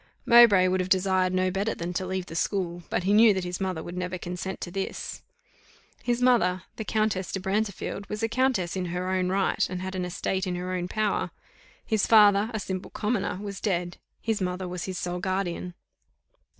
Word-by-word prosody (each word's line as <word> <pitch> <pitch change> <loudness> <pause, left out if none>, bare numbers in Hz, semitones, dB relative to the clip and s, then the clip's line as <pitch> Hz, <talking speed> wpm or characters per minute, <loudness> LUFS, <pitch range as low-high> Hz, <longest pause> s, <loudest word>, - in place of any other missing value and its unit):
Mowbray 230 -6 +7
would 185 0 +1
have 185 0 -1
desired 185 -1 +2
no 185 0 +1
better 200 +4 -1
than 170 +1 -4
to 185 +1 -2
leave 185 -1 -2
the 165 - -9
school, 175 -1 -1
but - - -1
he 195 +2 +2
knew 215 -1 +7
that 190 - -1
his 180 +1 -4
mother 185 -4 -2
would 175 - -7
never 180 0 -3
consent 180 +2 -5
to 175 - -5
this. 195 +1 -4 0.8
His 245 0 0
mother, 185 -8 +3
the 220 - -3
Countess 215 -4 0
de 195 - -2
Brantefield, 200 0 -2
was 210 +1 -4
a - - +3
Countess 230 -7 0
in 185 -1 -2
her 180 +1 -2
own 185 -1 +1
right, 195 +1 +1
and 180 0 -4
had 190 +1 -5
an 185 -1 -2
estate 190 +2 -2
in 180 - -1
her 180 +1 -3
own 180 -1 -2
power; 215 +2 0 0.6
his 220 -3 +1
father, 210 -1 +6
a 220 - -3
simple 190 -1 -4
commoner, 210 -4 -1
was 200 -2 -6
dead, 180 -4 -1 0.2
his 225 -3 -1
mother 180 0 -2
was 180 0 -4
his 185 -1 -4
sole 180 0 -3
guardian. 180 -1 -2
185 Hz, 200 wpm, -27 LUFS, 180-205 Hz, 0.8 s, Mowbray